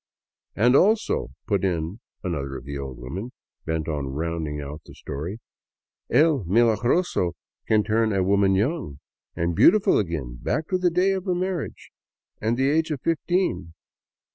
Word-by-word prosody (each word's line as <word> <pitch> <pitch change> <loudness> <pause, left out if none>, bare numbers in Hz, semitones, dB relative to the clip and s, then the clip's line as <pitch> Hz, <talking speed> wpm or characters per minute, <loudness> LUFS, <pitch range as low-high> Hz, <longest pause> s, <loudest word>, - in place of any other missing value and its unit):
" - - -69
And 120 +5 +4
also," 215 +8 +3 0.2
put 100 -4 0
in 85 +2 -1 0.2
another 70 -7 -3
of 65 - -10
the 70 +1 -6
old 70 -2 -6
women, 90 - -6 0.4
bent 80 -1 -1
on 75 -4 -2
rounding 80 -1 -3
out 75 +2 -7
the - - -14
story, 80 +9 -5 0.4
" - - -63
El 145 -2 +4
Milagroso 115 - +2 0.3
can 110 -1 +3
turn 110 +1 +1
a 95 -2 +1
woman 100 0 +3
young 110 - -1 0.4
and 85 0 -1
beautiful 195 - +5
again, 75 - -3
back 155 +3 -1
to 185 - +1
the 180 -1 +3
day 180 +3 +2
of 190 -1 -2
her 180 -2 +1
marriage 180 -2 -3 0.5
and 115 +2 0
the 135 +1 +2
age 160 +3 +2
of 150 -4 -2
fifteen." 165 - 0
100 Hz, 165 wpm, -24 LUFS, -, 0.5 s, beautiful